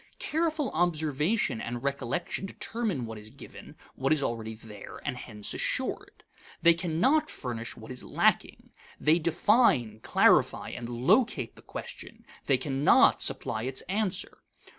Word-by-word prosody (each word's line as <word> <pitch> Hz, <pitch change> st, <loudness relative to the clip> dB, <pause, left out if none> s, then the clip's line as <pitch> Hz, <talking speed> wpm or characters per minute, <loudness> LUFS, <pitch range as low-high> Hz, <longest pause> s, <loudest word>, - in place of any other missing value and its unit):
Careful 315 Hz, -3 st, -1 dB
observation 155 Hz, -, 0 dB
and 120 Hz, +1 st, -5 dB
recollection 140 Hz, +8 st, -2 dB
determine 205 Hz, -, -3 dB
what 110 Hz, -1 st, -7 dB
is 105 Hz, +1 st, -10 dB
given, -, -, -12 dB, 0.2 s
what 135 Hz, +1 st, -1 dB
is 155 Hz, -3 st, +3 dB
already 110 Hz, -2 st, -3 dB
there, 110 Hz, -2 st, -11 dB
and 140 Hz, -3 st, -2 dB
hence 105 Hz, -4 st, -5 dB
assured. -, -, -2 dB, 0.4 s
They 170 Hz, 0 st, +8 dB
cannot 185 Hz, -, +1 dB
furnish 120 Hz, -3 st, -6 dB
what 110 Hz, +2 st, -10 dB
is 125 Hz, -, -5 dB
lacking. -, -, 0 dB, 0.3 s
They 155 Hz, +3 st, +4 dB
define, 165 Hz, -, +3 dB
clarify, -, -, +3 dB
and 120 Hz, -1 st, -6 dB
locate 125 Hz, -, +1 dB
the -, -, -15 dB
question; -, -, -9 dB, 0.2 s
they 135 Hz, -, +4 dB
cannot 135 Hz, +2 st, +4 dB
supply 110 Hz, -, -1 dB
its 130 Hz, +2 st, -2 dB
answer. 200 Hz, 0 st, -3 dB
140 Hz, 135 wpm, -28 LUFS, 120-180 Hz, 0.4 s, They